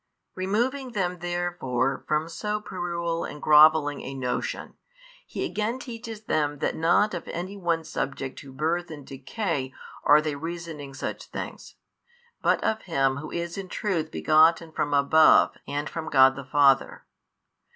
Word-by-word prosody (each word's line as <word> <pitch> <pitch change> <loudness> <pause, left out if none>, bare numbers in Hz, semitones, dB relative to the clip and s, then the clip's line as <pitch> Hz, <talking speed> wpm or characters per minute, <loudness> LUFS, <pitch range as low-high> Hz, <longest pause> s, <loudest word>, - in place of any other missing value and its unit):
Removing 240 +7 -1
them 180 -4 -1
therefore 175 -7 -2
from 155 +1 0
so 210 +5 -3
puerile 170 -4 -3
and 150 - -7
grovelling 150 -1 +5
a 135 - -7
notion, 125 -2 -3 0.5
He - - -3
again 220 +4 -2
teaches 230 -4 -8
them 145 -7 0
that - - -1
not 175 +6 +3
of 175 - -5
any 185 +4 -5
one 170 -4 -1
subject 135 -3 -4
to 140 - -11
birth 165 +6 -1
and 145 -4 -9
decay 135 - -3 0.3
are 150 +1 +7
they 155 -1 -2
reasoning 160 -2 -6
such - - -5
things, - - -7 0.7
but - - +2
of 220 0 0
Him 135 -6 0
Who 145 - -7
is 170 +2 -4
in 195 - -6
truth 170 -7 -2
begotten 160 +1 +3
from 145 -2 -2
above 150 +3 +6 0.2
and 145 +1 -3
from 160 +3 -5
God 135 -1 +6
the 140 -1 -8
Father. 135 0 +3
160 Hz, 150 wpm, -26 LUFS, 145-180 Hz, 0.7 s, are